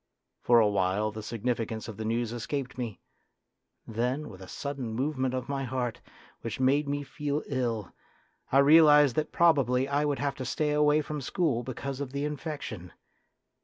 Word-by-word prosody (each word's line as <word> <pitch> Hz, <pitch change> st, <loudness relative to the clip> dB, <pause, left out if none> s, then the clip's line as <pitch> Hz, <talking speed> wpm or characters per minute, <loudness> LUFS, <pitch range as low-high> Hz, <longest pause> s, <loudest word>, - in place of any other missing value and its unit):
For 120 Hz, -1 st, +5 dB
a 110 Hz, -, +5 dB
while 100 Hz, +1 st, +1 dB
the 110 Hz, +1 st, -7 dB
significance 115 Hz, 0 st, -3 dB
of 110 Hz, -3 st, -8 dB
the 110 Hz, -, -4 dB
news 115 Hz, +1 st, -1 dB
escaped 130 Hz, +3 st, -4 dB
me; 120 Hz, -5 st, -5 dB, 0.9 s
then, 125 Hz, +7 st, -2 dB
with 95 Hz, -3 st, -12 dB
a 95 Hz, -, -9 dB
sudden 135 Hz, -3 st, -5 dB
movement 130 Hz, 0 st, -1 dB
of 130 Hz, -1 st, -3 dB
my 140 Hz, -1 st, -2 dB
heart, 125 Hz, -2 st, -3 dB, 0.4 s
which 115 Hz, 0 st, -5 dB
made 140 Hz, +3 st, +2 dB
me 145 Hz, 0 st, -1 dB
feel 145 Hz, +2 st, -3 dB
ill, 120 Hz, -7 st, -2 dB, 0.6 s
I 135 Hz, -, +4 dB
realised 150 Hz, -3 st, +7 dB
that 155 Hz, -, 0 dB
probably 135 Hz, -6 st, +3 dB
I 145 Hz, +1 st, +1 dB
would 145 Hz, -2 st, 0 dB
have 140 Hz, -1 st, -1 dB
to 130 Hz, -, -4 dB
stay 150 Hz, +4 st, 0 dB
away 150 Hz, 0 st, +4 dB
from 150 Hz, 0 st, -5 dB
school 140 Hz, -3 st, 0 dB
because 135 Hz, +2 st, -5 dB
of 135 Hz, -2 st, -5 dB
the 140 Hz, +1 st, -1 dB
infection. 145 Hz, -, -5 dB
130 Hz, 170 wpm, -29 LUFS, 115-145 Hz, 0.9 s, realised